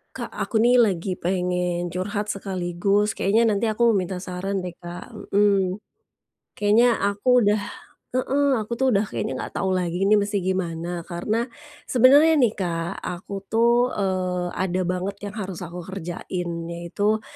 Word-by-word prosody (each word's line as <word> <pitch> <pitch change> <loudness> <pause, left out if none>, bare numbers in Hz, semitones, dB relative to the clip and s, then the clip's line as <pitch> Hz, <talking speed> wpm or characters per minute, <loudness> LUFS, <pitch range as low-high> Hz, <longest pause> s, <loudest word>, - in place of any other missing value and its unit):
Kak, - - -5
aku 220 - -1
nih 245 +2 +5
lagi 190 -5 +2
pengen 180 -1 -1
curhat 200 +4 -3
sekaligus 195 +1 0
kayaknya 225 +4 +3
nanti 210 +1 +1
aku 225 0 +3
minta 185 -1 -2
saran 190 +2 -3
deh, 180 -1 -6
Kak, 175 +1 -9 0.2
mmm. 200 -1 +2 0.8
Kayaknya 225 +3 +4
aku 205 +5 +3
udah 210 -2 +3 0.5
heeh, 270 +3 +1
aku 215 +1 -5
tuh 265 +2 +2
udah 210 -2 +2
kayaknya 120 - -3
nggak - - -6
tahu 190 - 0
lagi 180 0 -1
ini 210 +1 +5
mesti 200 -1 -1
gimana 175 -2 -2
karena 210 +7 -1 0.4
sebenernya 280 +6 +6
nih, 235 - +5
Kak, 170 -2 -2
aku 180 +3 -6
tuh, 235 +3 +3
eee, 185 -2 -1
ada 185 0 -1
banget 180 +2 -2
yang 205 - -4
harus 190 -3 -5
aku 175 0 -7
kerjain 180 -1 -5 0.2
yaitu, 180 +6 -1
195 Hz, 150 wpm, -24 LUFS, 180-215 Hz, 0.8 s, sebenernya